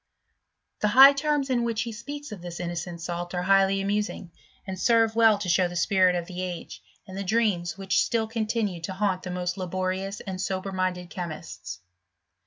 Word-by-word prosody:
The 210 - +2
high 265 +6 +9
terms 285 -1 0
in 240 -2 +2
which 230 -1 -1
he 235 - -5
speaks 285 +5 -7
of 205 -4 -8
this 175 -1 -7
innocent 175 0 -4
salt 175 +1 -4
are 180 - -1
highly 195 +1 +4
amusing, 200 -2 -2 0.3
and 190 -2 -6
serve 225 +2 +3
well 225 -2 +5
to 200 -2 -5
show 180 +1 +3
the 175 - -8
spirit 185 +1 +3
of 175 -1 -2
the 180 +1 -6
age, 180 -2 -6 0.2
and 190 -2 -10
the 200 - -3
dreams 195 -4 0
which 195 -1 +1
still 230 -1 0
continued 220 -5 -2
to 190 - -5
haunt 190 -1 0
the 185 - -7
most 180 +1 -3
laborious 185 +2 -2
and 190 -2 -5
sober 190 0 -3
minded 185 -1 -2
chemists. 160 - -7
190 Hz, 190 wpm, -26 LUFS, 180-220 Hz, 0.3 s, high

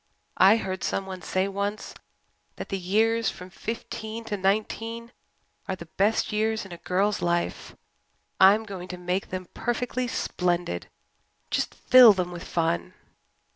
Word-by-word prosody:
I 195 +4 +7
heard 190 -3 -4
someone 190 -1 -3
say 185 +3 0
once 200 +2 -3 0.6
that - - -7
the 195 - -2
years 225 +5 +2
from 180 +1 -10
fifteen 225 +1 -6
to 225 -2 -3
nineteen 225 +4 -1 0.6
are 190 - -2
the 170 - -10
best 200 +6 +1
years 215 0 0
in 195 - -11
a 175 - -7
girl's 200 +3 0
life. 175 0 -1 0.6
I'm 200 +3 +7
going 190 -4 -7
to 180 0 -6
make 180 +2 -2
them 185 -1 -5
perfectly 250 +1 -2
splendid 175 - -2 0.6
just - - -1
fill 250 -4 +8
them 180 -2 -2
with 175 0 -7
fun." 170 +3 -1
195 Hz, 140 wpm, -26 LUFS, 180-220 Hz, 0.6 s, fill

